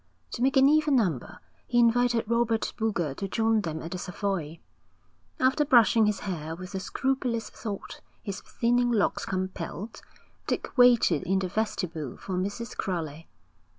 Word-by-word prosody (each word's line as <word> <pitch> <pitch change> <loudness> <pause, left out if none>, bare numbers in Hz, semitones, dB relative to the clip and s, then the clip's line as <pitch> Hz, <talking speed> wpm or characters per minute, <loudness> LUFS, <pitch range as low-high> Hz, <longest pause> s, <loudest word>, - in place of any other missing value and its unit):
To 240 - -5
make 270 +2 +3
an 265 0 +7
even 300 -1 +4
number 180 - -1 0.3
he 240 - 0
invited 240 -1 +3
Robert 235 -1 +1
Boulger 175 -10 -1
to 195 - -3
join 225 +1 +2
them 160 -4 -4
at 165 - -7
the 185 - -4
Savoy. 180 -4 -3 0.8
After 265 +3 +3
brushing 230 -5 +5
his 210 -2 -1
hair 165 -5 -4
with 185 +1 -9
the 190 - -3
scrupulous 250 0 -2
thought 205 -4 -7 0.2
his 200 -3 -5
thinning 245 +1 +1
locks 215 -4 +1
compelled, 185 +2 -4 0.5
Dick - - -3
waited 240 - +5
in 190 +1 0
the 190 -1 -1
vestibule 175 - -3
for 190 - -6
Mrs. 205 +5 -3
Crowley. 165 -4 -4
210 Hz, 150 wpm, -27 LUFS, 180-235 Hz, 0.8 s, an